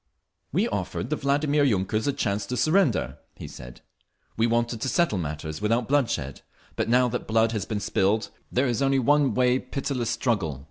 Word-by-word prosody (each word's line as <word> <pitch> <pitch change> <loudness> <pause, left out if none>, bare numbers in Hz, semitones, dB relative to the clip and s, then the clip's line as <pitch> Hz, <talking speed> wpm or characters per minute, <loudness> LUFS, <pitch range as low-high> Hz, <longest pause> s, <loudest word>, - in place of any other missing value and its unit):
"We - - +1
offered - - -3
the - - +2
Vladimir 145 +1 +1
yunkers 110 -1 +1
a - - +3
chance 100 -6 -2
to 125 - -3
surrender," 185 +7 +2 0.2
he - - -8
said. - - -11 0.5
"We 115 +1 +2
wanted 115 -1 0
to 130 - -1
settle 165 - +1
matters 80 +1 -5
without 115 +3 +1
bloodshed. 115 - 0 0.3
But - - -1
now 125 +1 +4
that 125 - -4
blood 115 0 +2
has 105 -4 -2
been 105 -1 -3
spilled 100 +1 0 0.2
there 130 +3 +2
is 120 0 0
only 135 0 +3
one 140 +2 +3
way—pitiless 125 0 0
struggle. 95 - -1
120 Hz, 175 wpm, -25 LUFS, 105-135 Hz, 0.5 s, now